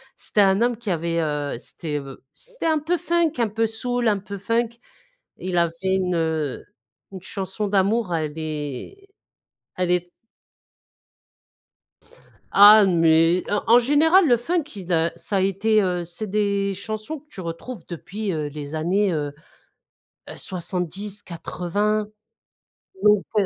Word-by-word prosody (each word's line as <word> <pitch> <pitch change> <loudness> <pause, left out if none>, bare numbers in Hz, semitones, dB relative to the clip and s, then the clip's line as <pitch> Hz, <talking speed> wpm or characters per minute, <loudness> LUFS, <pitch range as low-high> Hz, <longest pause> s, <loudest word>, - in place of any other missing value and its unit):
C'était 210 - 0
un 195 +1 +4
homme 240 -1 +2
qui 230 -2 -6
avait, 170 -1 -1
heu, 150 -2 -2
c'était, 150 +2 -5
heu, 135 -1 -9
b - - -24 0.2
c'était - - -8
un 315 -1 +2
peu 330 +4 0
funk, 340 -2 +1
un 235 -3 +1
peu 225 +2 0
soul, 245 +2 -1
un 210 -2 +3
peu 200 +1 -7
funk. 230 +4 0 0.7
Il 180 -1 -3
a 170 -1 +3
fait 190 +3 -1
une, 180 -2 0
heu, 160 -4 -1 0.5
une 190 -2 -8
chanson 195 +2 -4
d'amour 200 -1 +1
elle 155 -1 -3
est 155 - -6 0.7
elle 180 -1 +1
est 180 0 +1 2.5
Ah 205 +1 +9
mais, 165 -1 +4
en 205 0 0
en 235 +2 +7
général 315 +8 +4
le 240 -3 +5
funk 305 +5 -2
il 185 -3 -4
a 165 0 +2
ça 195 +3 -1
était, 205 +3 +2
heu, 180 -2 -1
c'est 175 +6 -6
des 200 -1 0
chansons 215 +9 -5
que 290 - -30
tu 245 -10 -9
retrouves 170 +8 -7
depuis, 195 +4 -5
heu, 155 -2 -2
les 145 +1 -7
années, 185 +5 +1
heu 145 -3 -2 1.0
heu, - - -9
70-80, 190 +3 -3 1.0
donc 210 -1 +5
heu 200 - +4
195 Hz, 150 wpm, -23 LUFS, 170-220 Hz, 2.5 s, Ah